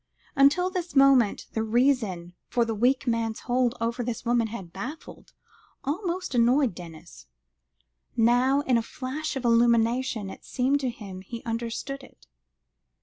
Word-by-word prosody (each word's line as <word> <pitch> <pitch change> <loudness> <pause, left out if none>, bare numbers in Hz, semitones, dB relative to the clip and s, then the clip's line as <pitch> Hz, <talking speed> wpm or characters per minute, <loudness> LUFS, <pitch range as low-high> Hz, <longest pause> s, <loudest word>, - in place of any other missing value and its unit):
Until 290 +7 +4
this 355 -3 -4
moment 270 -5 +4
the 220 - -1
reason 220 -7 +1
for 240 -1 +1
the 225 - -2
weak 250 +6 +2
man's 230 -2 -1
hold 245 -1 +1
over 230 +2 -1
this 240 0 -4
woman 235 -1 +2
had 195 -6 -8
baffled, 255 - -8 0.5
almost 355 +3 -3
annoyed, 245 0 +3
Denis. 170 -1 -12 0.9
Now, 245 +4 +3
in 255 -4 +2
a - - -1
flash 295 +4 -5
of 260 -2 -4
illumination, 235 -2 +2
it - - -12
seemed 265 +3 0
to 265 -2 -1
him 200 -6 -8
he 230 +5 -8
understood 235 +4 -4
it. - - -18
240 Hz, 145 wpm, -26 LUFS, 225-275 Hz, 0.9 s, Until